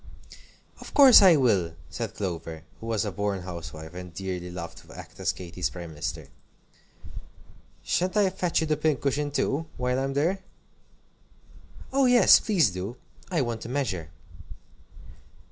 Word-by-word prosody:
"Of -, -, -12 dB
course 270 Hz, -6 st, +9 dB
I 185 Hz, -4 st, +8 dB
will!" 100 Hz, -, +2 dB, 0.2 s
said -, -, -5 dB
Clover, 85 Hz, -4 st, -5 dB, 0.2 s
who 115 Hz, -, -8 dB
was 110 Hz, -1 st, 0 dB
a 105 Hz, -, -3 dB
born 100 Hz, -1 st, -2 dB
housewife, 80 Hz, -2 st, -8 dB
and 90 Hz, 0 st, -8 dB
dearly 90 Hz, 0 st, -5 dB
loved 85 Hz, -1 st, -7 dB
to -, -, -15 dB
act -, -, -12 dB
as -, -, +1 dB
Katy's 90 Hz, -1 st, -4 dB
prime 85 Hz, -2 st, -8 dB
minister. 80 Hz, -1 st, -5 dB, 1.5 s
"Sha'n't 185 Hz, +3 st, 0 dB
I 200 Hz, -2 st, +3 dB
fetch 180 Hz, -3 st, 0 dB
you -, -, 0 dB
the 155 Hz, -1 st, 0 dB
pincushion 145 Hz, -1 st, 0 dB
too, 145 Hz, +2 st, -1 dB
while 125 Hz, +1 st, 0 dB
I'm 135 Hz, 0 st, -2 dB
there?" 170 Hz, +7 st, +1 dB, 1.5 s
"Oh 275 Hz, 0 st, +4 dB
yes, 245 Hz, -1 st, +7 dB
please 175 Hz, -, +2 dB
do! 95 Hz, +6 st, -6 dB, 0.3 s
I 170 Hz, -5 st, +1 dB
want 120 Hz, -3 st, -3 dB
to -, -, -7 dB
measure." 110 Hz, -, -2 dB
110 Hz, 145 wpm, -26 LUFS, -, 1.5 s, course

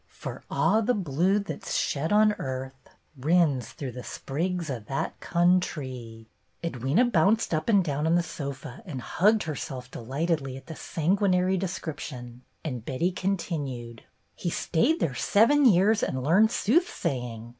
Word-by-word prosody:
For -, -, -8 dB
a' 220 Hz, -, +3 dB
the 250 Hz, +4 st, +2 dB
blude 190 Hz, +3 st, +1 dB
that 200 Hz, -, -6 dB
's -, -, -3 dB
shed 150 Hz, +3 st, -1 dB
on 210 Hz, 0 st, +5 dB
earth, 130 Hz, 0 st, -6 dB, 0.3 s
Rins 145 Hz, -3 st, +2 dB
through 135 Hz, -3 st, -6 dB
the 125 Hz, 0 st, -8 dB
springs 170 Hz, +4 st, -3 dB
o* 130 Hz, -5 st, -3 dB
that 135 Hz, -, -3 dB
countrie.'*' 135 Hz, -10 st, 0 dB, 0.4 s
Edwyna 165 Hz, -, +1 dB
bounced 200 Hz, +4 st, +3 dB
up 155 Hz, +7 st, -1 dB
and 200 Hz, -4 st, +5 dB
down 150 Hz, -1 st, -1 dB
on 165 Hz, -, +3 dB
the 175 Hz, -, +3 dB
sofa 140 Hz, -4 st, -7 dB
and 140 Hz, -7 st, -5 dB
hugged 210 Hz, -, +2 dB
herself 135 Hz, -5 st, -5 dB
delightedly 135 Hz, +2 st, -2 dB
at 135 Hz, -, -12 dB
the 160 Hz, -, -7 dB
sanguin 185 Hz, +6 st, +1 dB
ary 185 Hz, +1 st, +2 dB
description, 145 Hz, -9 st, -5 dB, 0.2 s
and 125 Hz, -8 st, -4 dB
Betty 135 Hz, +10 st, -1 dB
continued: 145 Hz, -, -3 dB, 0.3 s
"He 175 Hz, -, -3 dB
stayed 185 Hz, -, +1 dB
there 140 Hz, -, +1 dB
seven 235 Hz, -, +4 dB
years 210 Hz, 0 st, +5 dB
and 130 Hz, -1 st, -1 dB
learned 190 Hz, +10 st, +5 dB
soothsaying. 130 Hz, -, -1 dB
160 Hz, 150 wpm, -27 LUFS, 130-190 Hz, 0.4 s, on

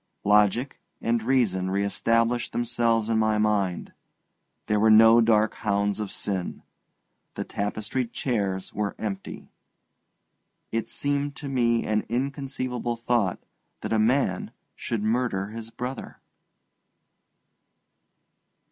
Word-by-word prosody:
Logic 105 Hz, +6 st, +3 dB, 0.2 s
and 115 Hz, 0 st, 0 dB
reason 110 Hz, -7 st, +1 dB
re 100 Hz, +1 st, 0 dB
established 115 Hz, +3 st, +1 dB
themselves 115 Hz, -2 st, +1 dB
in 115 Hz, -1 st, +1 dB
my 110 Hz, -1 st, +2 dB
mind, 105 Hz, -4 st, 0 dB, 0.7 s
there 105 Hz, 0 st, +1 dB
were 110 Hz, +1 st, +4 dB
no 115 Hz, +2 st, +8 dB
dark 110 Hz, -1 st, +3 dB
hounds 100 Hz, 0 st, 0 dB
of 105 Hz, -2 st, -3 dB
sin, 95 Hz, -3 st, -4 dB, 0.7 s
the -, -, -3 dB
tapestried 110 Hz, +4 st, -3 dB
chairs 100 Hz, -7 st, -2 dB
were 105 Hz, -1 st, -2 dB
empty. 100 Hz, -3 st, -6 dB, 1.2 s
It 115 Hz, 0 st, -2 dB
seemed 145 Hz, 0 st, -2 dB
to 145 Hz, -, -7 dB
me 120 Hz, -3 st, +1 dB
an 105 Hz, 0 st, 0 dB
inconceivable 130 Hz, -2 st, -2 dB
thought 115 Hz, -5 st, 0 dB, 0.4 s
that -, -, -2 dB
a 110 Hz, -, +3 dB
man 110 Hz, -4 st, +1 dB, 0.3 s
should 115 Hz, -3 st, -3 dB
murder 110 Hz, -3 st, 0 dB
his 115 Hz, +1 st, -8 dB
brother. 125 Hz, +3 st, -6 dB
115 Hz, 110 wpm, -26 LUFS, 105-120 Hz, 1.2 s, no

